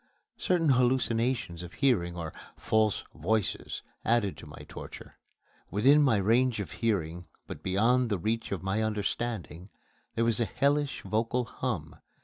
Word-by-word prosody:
Certain 170 -4 +2
hallucinations 125 -7 +1
of 90 0 -9
hearing, 90 -11 +1
or 80 -2 -5 0.2
"false 110 -1 +1
voices," 110 -3 -1 0.2
added 115 -4 +2
to - - -11
my - - -11
torture. - - -10 0.5
Within 135 +9 +5
my 130 -7 +4
range 115 +4 +2
of 100 - -4
hearing, 90 -7 -1 0.2
but - - -8
beyond 115 +6 +2
the 100 - +1
reach 110 +6 -2
of 95 -2 -3
my 95 +3 0
understanding, 105 -4 -3 0.5
there 115 - +2
was 115 -1 +3
a 120 - +2
hellish 145 +4 0
vocal 115 +5 0
hum. 110 -12 -4
110 Hz, 140 wpm, -29 LUFS, 95-125 Hz, 0.5 s, Within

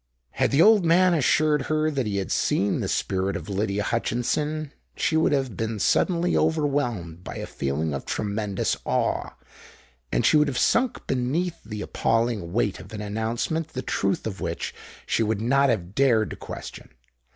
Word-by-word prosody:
Had - - +1
the 145 +4 +5
old 215 -3 +6
man 175 +2 +4
assured 150 -1 +2
her 155 0 +1
that 135 -6 -1
he 100 -1 -1
had 95 -2 -3
seen 100 +1 +1
the - - -2
spirit 95 0 -1
of - - -6
Lydia 100 +1 -1
Hutchinson, 145 +7 -1 0.2
she 160 - 0
would 160 - +3
have 135 -6 0
been 110 +1 -2
suddenly 175 - +2
overwhelmed 140 - 0
by - - -7
a - - -4
feeling 70 +3 -2
of 70 - -4
tremendous 105 -1 -1
awe; - - -1 0.8
and - - +1
she 155 - +5
would 150 0 +4
have 135 -3 -2
sunk 245 +1 +1
beneath 155 +7 -1
the 105 -1 -6
appalling 115 -6 0
weight 105 -1 0
of - - -12
an 105 - -5
announcement 115 +10 -2
the 130 - -4
truth 100 0 -1
of 100 -4 -5
which 85 0 -3 0.3
she - - 0
would 110 -1 0
not 135 +5 +3
have 95 -6 -1
dared 115 -4 +3
to - - -5
question. - - -9
120 Hz, 175 wpm, -25 LUFS, 100-150 Hz, 0.8 s, old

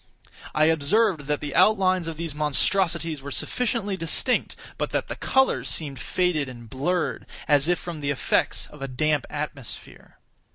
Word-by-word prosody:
I 155 - +5
observed 160 +1 +2
that 150 -1 0
the 145 -2 -4
outlines 185 -5 +4
of 165 -1 -5
these 165 -2 -3
monstrosities 165 +1 +1
were 140 - -7
sufficiently 215 - -1
distinct, 190 +8 0 0.2
but - - -1
that - - -2
the - - -3
colors 265 0 +2
seemed 140 -5 -1
faded 170 -6 0
and 120 -2 -10
blurred, 160 +9 -1 0.2
as 145 0 +4
if 175 0 +3
from 165 -3 -7
the 140 - -1
effects 140 - +1
of 150 - -15
a 135 - -3
damp 145 +2 0
atmosphere. 145 -4 -7
155 Hz, 160 wpm, -25 LUFS, 145-180 Hz, 0.2 s, I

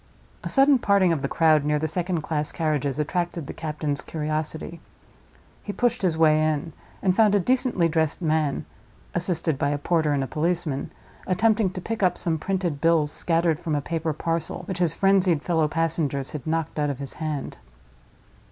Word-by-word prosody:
A - - -4
sudden 270 -1 +5
parting 200 -5 +3
of 150 - -2
the 140 - -1
crowd, 155 -1 +3
near 150 0 +1
the 155 +1 -1
second 175 +1 -2
class 150 -1 -2
carriages, 150 -4 -1
attracted 170 +1 -2
the - - -7
captain's 150 -2 -3
curiosity. 155 +1 -4 0.8
He 205 - -5
pushed 245 +1 0
his 175 -4 +1
way 155 -1 +4
in; 155 +1 -1 0.3
and 185 -2 +3
found 210 -1 +4
a - - +4
decently 250 -4 +2
dressed 160 -2 0
man—assisted 160 0 -2
by 140 - +1
a 145 - 0
porter 155 0 +1
and 140 -2 +1
a - - -4
policeman—attempting 180 - -1
to 185 0 -7
pick 225 +3 -4
up 180 -2 +2
some 160 -2 -1
printed 175 -5 -2
bills 165 -3 +3
scattered 165 -1 +1
from 160 -3 -2
a - - +1
paper 165 +1 -2
parcel, 165 +1 -2
which 190 -2 -4
his 170 -3 +1
frenzied 190 -5 +3
fellow 160 -3 +2
passengers 155 -4 -1
had 150 -3 -7
knocked 160 -1 -1
out 145 -1 +1
of 140 - -3
his 140 0 -6
hand. 155 -3 -3
160 Hz, 175 wpm, -25 LUFS, 150-180 Hz, 0.8 s, sudden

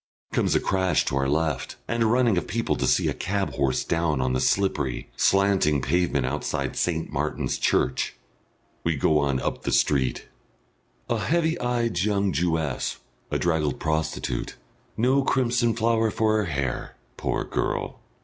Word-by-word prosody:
Comes - - +2
a - - +4
crash 95 -4 +1
to - - -1
our 70 0 +1
left, 80 -1 -1
and 115 0 -1
a 115 - +4
running 120 -2 +3
of 90 - -1
people 115 +5 -1
to - - -1
see - - +3
a - - 0
cab 100 +1 -2
horse 70 -2 0
down 80 -4 0
on 65 0 0
the 65 - +1
slippery, 70 -9 0
slanting 95 -7 +3
pavement 85 -3 +1
outside 75 +3 -2
St. 80 -2 -1
Martin's 75 +1 -2
Church. - - +1 0.7
We 85 -1 +1
go 75 +2 +3
on 70 -2 +1
up - - -3
the - - -2
street. 65 -4 +1 0.8
A 115 - 0
heavy 160 +7 +1
eyed 120 -6 0
young 100 0 +1
Jewess, 80 -3 -1 0.3
a - - 0
draggled 80 -5 0
prostitute 80 -5 -2 0.4
no 130 +4 +3
crimson 120 -3 +1
flower 115 -1 +2
for 110 0 +1
her 105 - +1
hair, 70 -6 -3 0.2
poor - - -1
girl! - - -2
85 Hz, 160 wpm, -25 LUFS, 75-110 Hz, 0.8 s, a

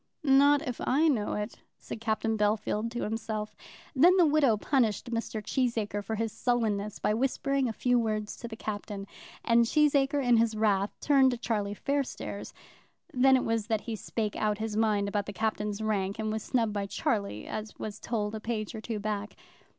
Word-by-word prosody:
"Not 285 +2 +5
if 245 - -4
I 300 +5 +3
know 230 -9 +1
it," 210 0 -4 0.2
said 220 - -8
Captain 225 0 0
Bellfield 210 +1 0
to 240 +1 -4
himself. 220 -1 -3 0.4
Then 350 +8 +6
the 355 - +6
widow 290 -7 +4
punished 235 -2 0
Mr. 230 -2 -3
Cheesacre 220 -5 -1
for 220 +2 -3
his 225 0 -2
sullenness 215 -5 -1
by 210 - 0
whispering 270 +2 0
a - - -1
few 245 +3 +2
words 215 -2 -2
to 235 - -7
the 225 - -7
Captain; 205 -2 -5 0.4
and 235 0 +5
Cheesacre 280 0 +2
in 240 -1 +5
his 225 -1 +2
wrath 205 -2 +2
turned 275 -3 +5
to 245 - -2
Charlie 210 -3 -2
Fairstairs. 280 +3 -3 0.6
Then 265 +1 +5
it 255 - -1
was 225 -2 -1
that 220 -2 0
he 230 - -4
spake 215 0 -3
out 210 -1 0
his 220 -1 -3
mind 210 -2 +2
about 205 0 -2
the 205 - -5
Captain's 210 -1 -2
rank, 200 -2 -1
and 215 -1 -2
was 220 0 -2
snubbed 225 -3 0
by 200 -1 -2
Charlie, 200 - -2
as 215 0 -6
was 215 0 -6
told 215 -2 -2
a 220 - -4
page 215 -1 -3
or 220 - -6
two 225 -1 -4
back. 210 0 -3
220 Hz, 190 wpm, -29 LUFS, 210-245 Hz, 0.6 s, Then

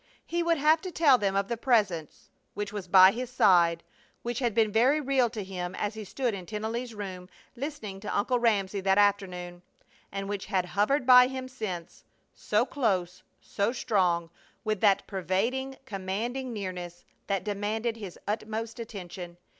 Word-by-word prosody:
He 345 0 -1
would 335 -1 +2
have 310 +2 +4
to 375 - -5
tell 290 -6 +5
them 195 -1 0
of 195 0 +1
the 235 - -1
Presence 205 - 0 0.2
which 205 0 -4
was 200 -3 -5
by 185 +1 +8
his 245 +3 -5
side, 175 -8 +4 0.4
which 240 -1 -2
had 240 -5 0
been 220 -2 +3
very 255 +8 +4
real 270 -4 +2
to 220 -3 -5
him 180 -1 -5
as 205 +1 -2
he 220 0 -7
stood 245 +3 -2
in 185 -3 -7
Tennelly's 225 +2 -4
room 185 -3 -7 0.3
listening 240 -8 -6
to 205 - -3
Uncle 245 +5 +1
Ramsey 205 -4 +1
that 190 0 +2
afternoon, 180 -4 +1 0.5
and 195 0 -4
which 200 -1 -4
had 190 -3 0
hovered 210 +10 +1
by 250 0 +8
him 260 0 -5
since, 205 -10 -6 0.3
so - - +1
close, 185 -9 -1 0.2
so 200 +3 -1
strong, 180 -9 0 0.3
with 215 -3 -1
that 200 -2 +4
pervading, 225 +8 -2
commanding 230 +5 -3
nearness 180 -5 -6 0.2
that 195 -2 -1
demanded 215 +3 -2
his 200 -6 -8
utmost 220 +2 -3
attention. 180 -5 -8
210 Hz, 165 wpm, -28 LUFS, 190-240 Hz, 0.5 s, by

